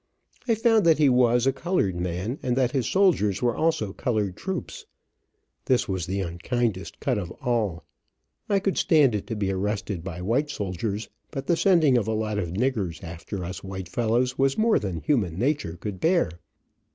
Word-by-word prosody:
I 230 - +3
found 225 -1 +3
that 160 - +6
he 150 -2 +5
was, 125 -1 +4
a 135 - +3
colored 140 - 0
man, 90 - -3
and 125 -2 0
that 125 -2 +2
his 130 -5 0
soldiers 160 - +3
were 120 -2 +2
also 155 -12 0
colored 105 -7 -1
troops. 420 - -5 0.8
This 130 -2 +2
was 95 -3 -2
the 95 +2 -1
unkindest 95 +4 -2
cut 125 -6 0
of 90 -4 -5
all. 105 -9 -1 0.7
I 200 - +3
could 195 -1 0
stand 150 -7 +4
it 105 - -3
to 115 - -3
be 100 -2 -1
arrested 100 -2 -2
by 90 -1 -6
white 130 +9 +1
soldiers, 100 - -3 0.2
but 135 -2 -5
the 170 - +2
sending 165 -9 +4
of 105 - -4
a 110 - 0
lot 110 -1 -1
of 90 -5 -2
"niggers" 100 -6 -1
after 85 +3 -6
us 90 +2 -6
white 95 -2 -6
fellows 120 +4 0
was 135 0 +2
more 225 +1 +3
than 95 -6 -4
human 100 - 0
nature 125 - -1
could 95 +1 -6
bear. 170 - +2
115 Hz, 185 wpm, -25 LUFS, 95-140 Hz, 0.8 s, that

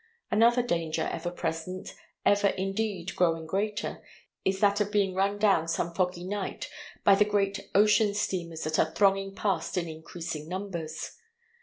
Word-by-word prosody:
Another 235 +3 +5
danger 165 -7 -1
ever 170 +1 -3
present, 175 +1 -4 0.3
ever 205 0 +4
indeed 195 -2 -2
growing 165 -2 +2
greater, 205 +5 -2 0.4
is 190 0 0
that 205 0 +3
of 205 0 0
being 200 -3 +2
run 195 +2 +1
down 195 -6 +3
some 170 +1 -1
foggy 180 0 0
night 195 +1 -4 0.4
by 200 - +7
the 200 +1 +5
great 200 -1 -1
ocean 210 0 +5
steamers 170 -5 -2
that 155 0 0
are 160 +1 +1
thronging 195 -1 +2
past 195 -2 -1
in 170 -1 0
increasing 160 -1 -6
numbers. 180 -4 -5
190 Hz, 150 wpm, -28 LUFS, 170-205 Hz, 0.4 s, by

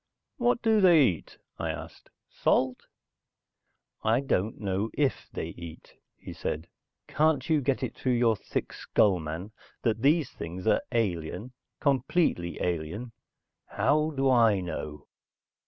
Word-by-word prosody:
"What 240 -1 +1
do 220 -2 +4
they 170 -6 +7
eat?" 85 -9 -3 0.2
I - - -2
asked. - - -7 0.2
"Salt?" 130 -1 0 1.2
"I 110 +2 +3
don't 110 -6 -1
know 100 +1 -1
if 145 -3 0
they - - -4
eat," 85 -2 -10 0.2
he - - -9
said. 80 +2 -3 0.4
"Can't 150 -3 +2
you 155 -2 +4
get 135 0 0
it 125 - -2
through 130 - -1
your 120 -2 +3
thick - - -4
skull, 100 -4 +2
man, 80 +6 -5 0.3
that 115 -2 +1
these 145 +1 +3
things 90 +4 -7
are 110 - +3
alien? 105 0 -1 0.3
Completely 135 - +1
alien? 90 +8 -3 0.6
How 150 +2 +2
do 135 -3 0
I 115 -6 +5
know?" 75 -4 -5
115 Hz, 135 wpm, -28 LUFS, 90-140 Hz, 1.2 s, they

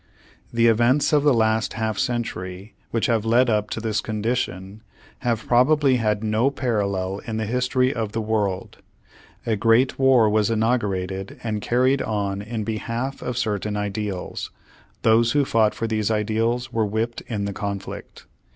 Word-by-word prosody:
The 115 0 +2
events 120 +6 +3
of 150 - +5
the 145 0 +4
last 110 -2 +1
half 110 -2 -2
century 100 -5 -3 0.2
which 115 - 0
have 115 -4 +1
led 120 +2 +3
up 105 -1 0
to - - -3
this 110 -1 -1
condition, 105 -3 -3 0.4
have 115 -3 -1
probably 130 +2 +4
had 105 -2 0
no 110 +4 +2
parallel 100 -8 -1
in 110 -1 -3
the 110 - -1
history 125 +3 +1
of 110 -4 -3
the 115 - -2
world, 105 -4 -2 0.7
A 115 - +1
great 115 +6 +3
war 130 -4 +5
was 105 0 +2
inaugurated 100 -5 -1
and 110 -2 -2
carried 130 +4 +2
on 100 -2 -2
in 110 +1 -4
behalf 115 +5 -3
of 125 -1 -4
cer 110 -5 0
tain 105 +1 -3
ideals, 105 -2 -4 0.5
those 115 +1 +4
who 145 -1 +3
fought 110 -4 +2
for 115 - -3
these 110 -2 0
ideals 115 +3 0
were 115 - +1
whipped 110 +3 -2
in 105 -4 -2
the 100 - -3
conflict. 100 -1 -6
110 Hz, 160 wpm, -23 LUFS, 105-120 Hz, 0.7 s, of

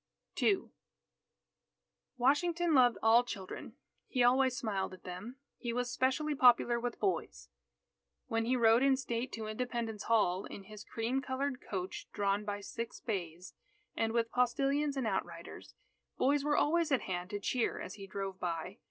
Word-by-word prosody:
II 400 -3 +2 1.5
Washington 330 +6 +2
loved 245 -4 +5
all 230 +2 +6
children. 200 -6 -7 0.3
He 250 -3 +1
always 255 +1 +4
smiled 195 -7 -2
at - - -21
them. 185 +7 -7 0.2
He 240 - -3
was 245 0 -1
specially 265 +4 +1
popular 245 -3 +5
with 240 0 -4
boys. 165 - -2 0.8
When 225 0 0
he 250 +2 +2
rode 230 0 +5
in 270 -1 +4
state 245 -1 -3
to 220 -1 -4
Independence 225 -1 -3
Hall 200 -5 +2
in 200 - -8
his 210 +1 -10
cream 235 +4 -2
coloured 265 -1 -2
coach 185 -2 -5
drawn 200 0 +1
by 205 0 -3
six 230 +3 -6
bays, 180 -5 -4 0.4
and 225 0 0
with 230 0 0
postilions 275 +4 +1
and 260 - 0
outriders, 170 -5 -4 0.4
boys 280 +1 +3
were 295 0 +2
always 330 0 +2
at 265 - +3
hand 180 -1 -4
to 205 - -3
cheer 235 +3 0
as 185 - -6
he 195 -1 -9
drove 195 -1 -5
by. 175 +4 -4
235 Hz, 155 wpm, -33 LUFS, 200-260 Hz, 1.5 s, all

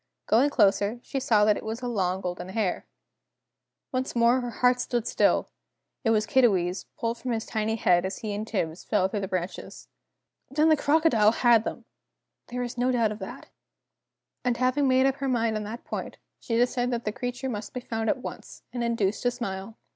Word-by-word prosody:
Going 250 +6 +4
closer, 205 -2 +2
she 275 - -3
saw 215 -5 +3
that 210 -1 +3
it - - -7
was 225 +3 -5
a - - -1
long 190 -5 0
golden 180 0 -5
hair. 195 -2 -2 1.0
Once 255 0 -2
more 235 +2 +4
her 245 - -4
heart 250 +2 +2
stood 240 -2 -1
still! - - +2 0.5
It 225 - +2
was 215 -1 +3
Kiddiwee's, 195 -8 +2
pulled 230 0 -2
from 250 -1 -2
his 225 -1 -2
tiny 220 0 -1
head 175 -5 +3
as 190 +1 -3
he 215 -2 -4
and 210 +2 -4
Tibbs 170 -6 -2
fell 200 -4 +2
through 205 +2 -3
the 195 - -3
branches. 185 -1 -5 0.6
Then 305 +3 +3
the 315 - +6
crocodile 285 -8 +3
had 235 -2 +4
them! - - -5 0.6
There 250 +1 -4
was 245 0 -4
no 250 +1 +2
doubt 230 -4 +2
of 215 - -6
that. 245 +7 -8 0.9
And 245 -1 +1
having 255 +3 +2
made 260 0 +4
up 270 0 +1
her 275 -1 -2
mind 230 -3 +1
on 215 -1 -3
that 225 +3 -7
point, - - -5 0.2
she 230 - -2
decided 245 0 +1
that 240 -1 -2
the 210 - 0
creature 245 +4 -4
must 210 -4 -5
be 250 - -4
found 225 -2 -3
at 255 -4 -1
once, - - -8
and 240 -1 -2
induced 225 -4 0
to 245 - +2
smile! 225 -3 -5
230 Hz, 200 wpm, -27 LUFS, 210-250 Hz, 1.0 s, the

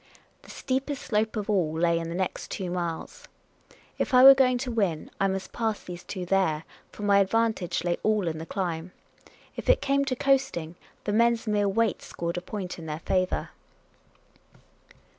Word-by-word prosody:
The - - -17
steepest 270 +2 -3
slope 215 0 0
of 210 - -3
all 175 -7 +1
lay 170 0 +2
in 165 0 -5
the 170 - -4
next 185 0 -3
two 185 -3 -4
miles. 170 -2 -4 0.7
If 265 - +1
I 250 - +8
were 270 +1 +12
going 255 -2 +3
to 250 - -3
win 195 -9 -1
I 195 - +4
must 190 0 -4
pass 225 -2 -2
these 175 -1 -8
two 185 -3 -5
there, 175 -5 +1 0.3
for 210 - -9
my 200 -1 +5
ad 195 -1 +2
vantage 220 -7 0
lay 175 -1 0
all 215 -4 +1
in 160 -1 -2
the 160 - -7
climb; 175 -2 -3 0.6
if - - -5
it - - +6
came 280 0 +1
to 265 -2 -1
coasting, 265 - +1 0.3
the 205 - -2
men's 235 +1 +3
mere 205 -2 +1
weight 225 +1 +1
scored 170 +1 -4
a - - -2
point 185 -1 -6
in 160 - -8
their 155 +1 -5
favour. 185 +1 -1
195 Hz, 185 wpm, -27 LUFS, 175-230 Hz, 0.7 s, were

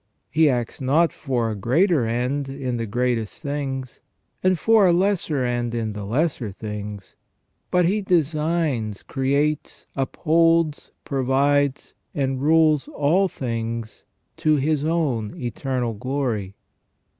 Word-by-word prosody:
He 155 0 +4
acts 120 0 -2
not 155 +6 +3
for 120 -6 -1
a - - -3
greater 130 - +2
end 125 +4 -1
in 135 -3 -3
the 115 -1 -3
greatest 120 +2 -1
things, 135 -3 -4 0.4
and 185 -1 +3
for 220 +2 +5
a 175 - +4
lesser 175 -7 +1
end 120 -1 -1
in 110 -2 -2
the 105 -1 -6
lesser 125 -1 -1
things; 105 -1 -7 0.5
but 180 -1 +3
He 205 +5 +1
designs, 155 - 0
creates, 140 +3 -1
upholds, 165 +3 +2 0.2
provides, 140 +1 +1 0.2
and 135 -2 -1
rules 155 -1 +4
all 170 +7 +2
things 115 - -4 0.3
to 155 -1 +3
His 150 +1 +1
own 145 -10 -1
eternal 125 0 -2
glory. 115 -5 -2
135 Hz, 120 wpm, -23 LUFS, 120-155 Hz, 0.5 s, for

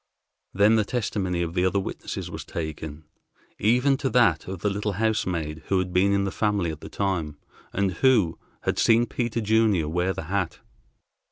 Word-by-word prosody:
Then 105 +3 +4
the 110 - +3
testimony 100 -6 -1
of 85 -1 -4
the 90 - +1
other 95 +2 +2
witnesses 95 - -5
was - - -6
taken, 80 -1 -6 0.6
even 125 +6 +3
to 135 - -1
that 110 -10 +3
of 95 -2 -6
the 105 - +1
little 105 +1 -2
housemaid 90 -7 -1
who 95 - +2
had 95 -1 -1
been 95 +2 +3
in 100 0 +2
the 100 - -2
family 100 -6 0
at 80 - -9
the - - -8
time, 85 -7 -2 0.3
and 100 -1 0
who 110 -5 +2 0.2
had - - -1
seen 115 +1 +4
Peter 120 -1 -2
Junior 105 -6 +2
wear 90 +4 0
the - - -5
hat. 95 +1 -2
100 Hz, 180 wpm, -25 LUFS, 85-110 Hz, 0.6 s, Then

